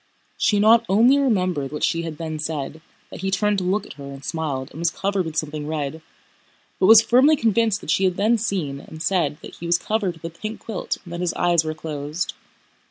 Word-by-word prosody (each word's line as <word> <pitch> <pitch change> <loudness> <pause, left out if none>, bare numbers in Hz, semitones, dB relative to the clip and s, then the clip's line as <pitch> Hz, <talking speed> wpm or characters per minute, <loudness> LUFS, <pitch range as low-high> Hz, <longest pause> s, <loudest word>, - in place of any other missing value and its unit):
She 205 - +2
not 220 +2 +6
only 235 +8 +5
remembered 185 - 0
what 150 - -5
she 165 - +1
had 165 -2 -6
then 155 -1 -5
said—that 155 +2 -7
he 195 - -1
turned 205 +2 +1
to - - -3
look 190 +4 0
at - - -10
her - - -7
and 140 0 -9
smiled 145 -5 -3
and - - -10
was 170 0 +2
covered 195 0 -1
with 160 -1 -5
something 150 -1 -3
red—but 155 0 -3 0.9
was 225 +1 +9
firmly 255 +7 +5
convinced 225 -4 +1
that - - -3
she 195 - +2
had 185 0 0
then 220 +3 +3
seen 175 -10 -2
and 155 - -11
said 165 -7 +1
that - - -10
he 170 - -6
was 170 0 +4
covered 195 -3 -2
with 165 0 -6
a - - -22
pink 215 +1 -5
quilt 220 -5 -4
and 175 -2 -10
that 170 - -4
his 180 -2 -1
eyes 175 -2 +3
were 155 0 -4
closed. 155 +1 -4
175 Hz, 220 wpm, -22 LUFS, 155-210 Hz, 0.9 s, was